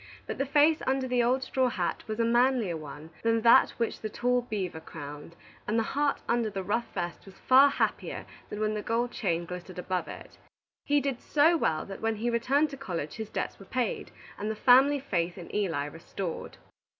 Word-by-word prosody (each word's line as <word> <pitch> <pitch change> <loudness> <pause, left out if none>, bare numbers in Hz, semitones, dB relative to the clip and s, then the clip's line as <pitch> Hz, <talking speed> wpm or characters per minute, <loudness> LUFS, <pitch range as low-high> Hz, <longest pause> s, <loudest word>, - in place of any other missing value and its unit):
But - - -5
the 275 - 0
face 300 +3 +4
under 265 0 +1
the 250 -1 +2
old 255 +3 +2
straw 260 -1 +1
hat 180 -7 -2
was 215 +1 -4
a 230 - +3
manlier 240 -5 +2
one 155 +1 -9
than 230 0 +2
that 230 +1 +7
which 230 - -2
the 215 - -3
tall 245 +3 +1
beaver 195 -8 -4
crowned, 150 0 -9 0.3
and 215 - +1
the 225 - +3
heart 290 0 +1
under 235 -2 +1
the 195 -2 -4
rough 230 +5 -1
vest 175 -2 -4
was 190 - -13
far 270 +2 +6
happier - - -2 0.2
than 210 - -5
when 215 0 +1
the 210 - -2
gold 235 +3 -1
chain 170 -5 -1
glittered 180 +1 -8
above 180 0 -2
it. - - -10 0.5
He 290 0 +3
did 270 -3 -2
so 310 +3 +4
well 155 - 0
that 195 - -8
when 225 0 0
he 235 +3 -1
returned 275 +6 +2
to 275 - -7
college 170 - -4
his 220 -1 -5
debts - - -4
were 195 - -12
paid, 250 -4 -2 0.3
and 210 - -2
the 220 - -2
family 265 +5 +5
faith 175 -9 -2
in 175 - -10
Eli 165 -9 0
restored. 165 +3 -6
225 Hz, 205 wpm, -29 LUFS, 180-255 Hz, 0.5 s, that